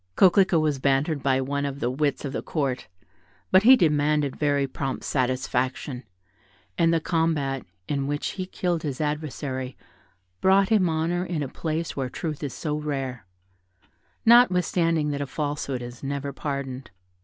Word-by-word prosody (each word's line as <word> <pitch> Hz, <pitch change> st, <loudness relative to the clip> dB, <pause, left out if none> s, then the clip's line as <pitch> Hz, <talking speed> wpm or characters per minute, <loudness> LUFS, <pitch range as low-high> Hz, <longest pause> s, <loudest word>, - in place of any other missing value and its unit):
Coquelicot 185 Hz, -2 st, +5 dB
was 150 Hz, -3 st, 0 dB
bantered 140 Hz, +2 st, +1 dB
by 130 Hz, 0 st, +2 dB
one 140 Hz, +2 st, -2 dB
of 140 Hz, -1 st, -3 dB
the 120 Hz, -1 st, 0 dB
wits 145 Hz, +2 st, -1 dB
of 140 Hz, -, -4 dB
the -, -, -2 dB
Court; 135 Hz, -5 st, -2 dB, 0.6 s
but 185 Hz, -, +7 dB
he 255 Hz, +5 st, +8 dB
demanded 150 Hz, -, +2 dB
very 145 Hz, -2 st, +1 dB
prompt 135 Hz, 0 st, -4 dB
satisfaction, 130 Hz, 0 st, -1 dB, 0.7 s
and 165 Hz, -, +3 dB
the 165 Hz, -, +3 dB
combat, 155 Hz, -, 0 dB, 0.2 s
in 140 Hz, -2 st, -1 dB
which 145 Hz, +1 st, -2 dB
he 185 Hz, -2 st, -5 dB
killed 175 Hz, -3 st, -1 dB
his 145 Hz, -5 st, -4 dB
adversary, 145 Hz, -4 st, -3 dB, 0.6 s
brought 190 Hz, +1 st, +4 dB
him 205 Hz, -6 st, +3 dB
honour 165 Hz, +2 st, 0 dB
in 170 Hz, -5 st, -2 dB
a -, -, -3 dB
place 160 Hz, +4 st, -3 dB
where 130 Hz, -2 st, -2 dB
truth 155 Hz, +2 st, -4 dB
is 145 Hz, -3 st, -3 dB
so 150 Hz, -2 st, -2 dB
rare, 135 Hz, -8 st, -4 dB, 1.0 s
notwithstanding 180 Hz, -9 st, +4 dB
that 140 Hz, 0 st, -3 dB
a 140 Hz, -, -3 dB
falsehood 145 Hz, -3 st, -3 dB
is 120 Hz, 0 st, -9 dB
never 140 Hz, 0 st, -3 dB
pardoned. 140 Hz, -2 st, -4 dB
145 Hz, 155 wpm, -25 LUFS, 135-165 Hz, 1.0 s, he